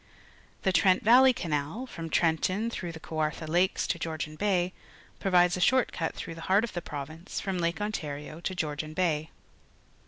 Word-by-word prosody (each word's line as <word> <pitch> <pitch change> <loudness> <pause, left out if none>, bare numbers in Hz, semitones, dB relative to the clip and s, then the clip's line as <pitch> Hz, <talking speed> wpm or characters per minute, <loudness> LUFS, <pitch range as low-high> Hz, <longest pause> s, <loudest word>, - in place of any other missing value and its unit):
The 190 - +3
Trent 185 +2 +4
Valley 255 +4 +7
Canal, 160 - -2
from 165 -9 -7
Trenton 185 +8 +1
tlirough 175 -6 -4
the 160 - -8
Kaicartha 155 0 -3
Lakes 175 +4 +2
to - - -1
Georgian 155 -1 -4
Bay, 185 -1 +1 0.5
provides 180 -2 +4
a - - -4
short 260 +6 +3
cut 165 - -3
through 165 - -6
the 165 - -10
heart 200 +3 +5
of 235 - -4
the 175 - -3
province 155 +4 -6
from 190 -2 -2
Lake 170 +2 0
Ontario 155 -7 -4
to 185 - -3
Georgian 155 -2 -3
Bay. 160 -4 0
175 Hz, 175 wpm, -29 LUFS, 155-195 Hz, 0.5 s, Valley